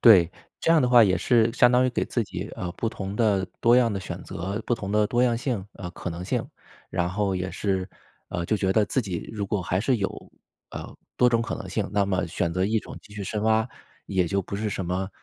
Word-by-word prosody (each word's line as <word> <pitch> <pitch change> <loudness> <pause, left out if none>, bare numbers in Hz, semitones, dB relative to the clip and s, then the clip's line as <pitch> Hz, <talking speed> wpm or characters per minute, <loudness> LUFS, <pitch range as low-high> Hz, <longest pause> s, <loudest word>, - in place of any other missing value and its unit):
对， 95 -8 +7 0.3
这 165 - +1
样 165 - +5
的 125 - +2
话 120 -2 +8
也 95 -3 +3
是 115 0 +3
相 125 0 +5
当 125 +1 +4
于 130 - +2
给 - - 0
自 120 - -1
己， - - -6
呃， 90 - -3
不 115 - -2
同 100 -2 -5
的、 105 -4 +2
多 120 +1 +6
样 120 -3 +4
的 100 - -2
选 90 - -6
择， 95 +5 -4
不 120 - +2
同 100 -4 -5
的 105 0 +3
多 120 +3 +1
样 120 -2 +3
性 115 -6 -2
呃， 90 -2 -6
可 90 - -6
能 85 +2 -6
性。 - - -1 0.4
然 90 -1 0
后 100 +1 0
也 95 0 -2
是， 95 -2 -1 0.4
呃， 85 -1 -3
就 110 - +2
觉 95 -1 +1
得 110 +1 +4
自 130 - +1
己 95 -5 -5
如 105 -2 -3
果 105 -1 -1
还 95 +1 0
是 125 +4 +2
有， 95 - -4 0.4
呃， - - -8 0.2
多 125 - +5
种 115 -1 +2
可 - - -3
能 - - -7
性， - - -1
那 100 -1 +3
么 95 -1 0
选 85 0 -1
择 90 +2 +1
一 110 +3 +2
种 - - -9
继 105 - -16
续 105 - -5
深 105 +2 -3
挖， 110 +1 +3 0.4
也 95 -3 +1
就 100 +4 0
不 100 - -5
是 105 +1 -2
什 95 - -3
么， 90 +2 -2
100 Hz, 270 characters per minute, -26 LUFS, 95-115 Hz, 0.4 s, 话